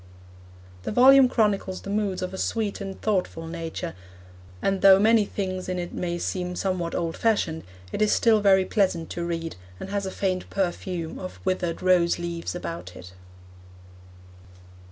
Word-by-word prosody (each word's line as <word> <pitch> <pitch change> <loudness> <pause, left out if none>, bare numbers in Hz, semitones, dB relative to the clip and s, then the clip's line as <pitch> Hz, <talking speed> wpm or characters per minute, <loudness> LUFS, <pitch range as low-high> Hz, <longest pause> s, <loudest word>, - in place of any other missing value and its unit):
The - - -4
volume 260 +3 +7
chronicles 205 -5 0
the 200 - -5
moods 200 -3 -1
of 185 +1 -4
a - - -5
sweet 215 -3 -2
and 195 -1 -6
thoughtful 185 -6 -1
nature, 165 +1 -5 0.7
and 195 - 0
though 195 -1 +8
many 215 +1 +4
things 185 -2 -4
in 185 - -2
it 175 -1 -5
may 175 -1 -2
seem 180 0 -3
somewhat 180 -3 -2
old 165 -1 -2
fashioned, 200 -8 0 0.3
it - - -3
is 215 - +3
still 225 -2 +4
very 190 -2 +5
pleasant 185 -6 0
to 170 - -3
read, 165 - -4 0.2
and - - -7
has 200 -1 -1
a - - -4
faint 185 -2 -2
perfume 180 -3 -3
of 185 - -8
withered 185 -2 -1
rose 180 -2 +3
leaves 170 0 -4
about 165 - -6
it. 90 +1 -11
185 Hz, 160 wpm, -25 LUFS, 170-200 Hz, 0.7 s, though